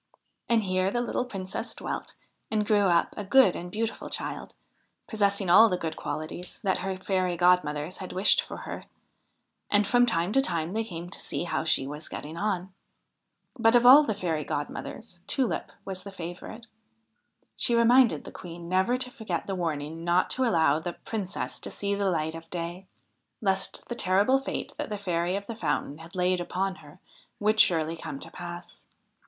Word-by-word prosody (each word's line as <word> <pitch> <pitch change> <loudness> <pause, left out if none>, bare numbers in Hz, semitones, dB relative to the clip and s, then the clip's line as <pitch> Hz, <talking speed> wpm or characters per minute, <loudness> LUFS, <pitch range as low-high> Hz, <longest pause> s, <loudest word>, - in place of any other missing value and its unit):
And 230 -2 +3
here 185 0 +1
the 240 - -1
little 245 +1 -1
Princess 195 -6 -5
dwelt - - -5 0.3
and 215 -1 0
grew 205 -2 +3
up 170 -2 +2
a 205 - -4
good 200 -1 +5
and 175 - -6
beautiful 225 +2 -3
child, - - -4 0.5
possessing 200 -3 +1
all 215 +6 +8
the 180 - 0
good 160 -2 -4
qualities 155 +3 -5
that 195 -4 +1
her 190 0 -2
fairy 185 -2 0
godmothers 175 -2 +2
had 185 - -6
wished 190 +3 +4
for - - -8
her; - - -6 0.8
and 205 0 +4
from 245 +4 +4
time 180 -2 0
to 270 - +5
time 170 -7 -1
they 225 +1 0
came 175 -4 -7
to - - -3
see - - -3
how 175 - -1
she 155 -4 +1
was 150 +3 -6
getting 155 +2 -7
on. 190 -1 -2 0.9
But, 225 0 +5
of 240 0 +5
all 265 +4 +10
the 225 -8 -1
fairy 165 -6 -1
godmothers, 175 +7 -5
Tulip 260 -4 0
was 190 -1 -5
the 200 +2 -9
favourite. 180 +6 -8 0.9
She 235 - +4
reminded 235 +1 +5
the - - -9
Queen 170 -1 -9
never 190 +7 +2
to 255 0 -4
forget 215 -8 -4
the 195 - -3
warning 165 -2 -3
not 175 +1 +2
to 260 - +1
allow 160 - +3
the 175 +2 -4
Princess 200 -2 -5
to - - -5
see 200 0 -2
the 200 -1 +1
light 160 -2 -1
of 165 0 -10
day, 175 +2 -5 0.5
lest 195 -2 0
the - - -3
terrible 205 +5 +3
fate 270 - -4
that - - -3
the 210 - -3
Fairy 180 -2 -1
of 200 0 -4
the 230 - -6
Fountain 155 -8 -2
had 165 +3 -12
laid 180 0 +1
upon 185 +2 -2
her 155 +2 -15 0.4
would 215 +1 +2
surely 165 -3 +4
come 145 -4 -6
to - - -10
pass. 175 0 -9
185 Hz, 185 wpm, -27 LUFS, 170-215 Hz, 0.9 s, all